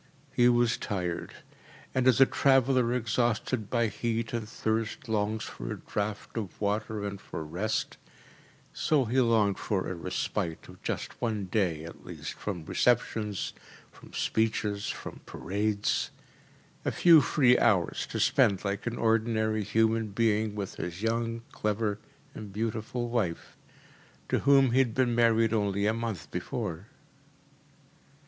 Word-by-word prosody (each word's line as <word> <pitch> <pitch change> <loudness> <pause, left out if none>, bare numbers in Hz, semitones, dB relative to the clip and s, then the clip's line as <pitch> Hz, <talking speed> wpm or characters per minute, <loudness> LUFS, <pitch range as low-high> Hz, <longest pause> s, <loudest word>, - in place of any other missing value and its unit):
He 120 0 +5
was 120 -1 +3
tired, 90 -4 -3 0.6
and 130 -1 +2
as 130 -2 +5
a 135 - +9
traveller 130 -3 +3
exhausted 120 -1 0
by 115 -1 +2
heat 115 +1 -2
and 110 -2 -3
thirst 110 -1 -2
longs 110 0 0
for - - -6
a - - -4
draught 105 0 -4
of 105 -6 -5
water 105 0 -1
and 100 -1 -5
for - - -6
rest, 90 +8 -2 0.8
so 145 -4 +2
he 125 +4 +2
longed 110 -5 +3
for 95 -3 -1
a - - -3
respite 85 -1 -3
of - - -14
just - - -4
one 110 -4 -1
day 90 -5 0
at 85 - -10
least - - -7
from 90 -6 -5
receptions, 110 -3 0 0.4
from - - -16
speeches, 105 -2 0
from - - -6
parades 105 +1 -1 0.7
a - - 0
few 165 -3 +7
free 125 -4 +4
hours 100 -8 +2
to - - -4
spend 100 0 +3
like 100 +3 -2
an 120 - -2
ordinary 110 -1 +1
human 110 +2 +2
being 110 0 +1
with 100 -2 -5
his 90 +4 -5
young, 115 0 -1
clever, 105 -1 -1 0.3
and 105 -2 -8
beautiful 110 +3 -2
wife, 110 -8 -2 0.7
to - - +2
whom 135 -2 +5
he 130 - +3
had 120 -4 +2
been 125 -2 +2
married 115 -1 +3
only 100 -2 +1
a 110 - +3
month 110 -11 -4
before. 85 +4 -4
110 Hz, 140 wpm, -29 LUFS, 100-115 Hz, 0.8 s, a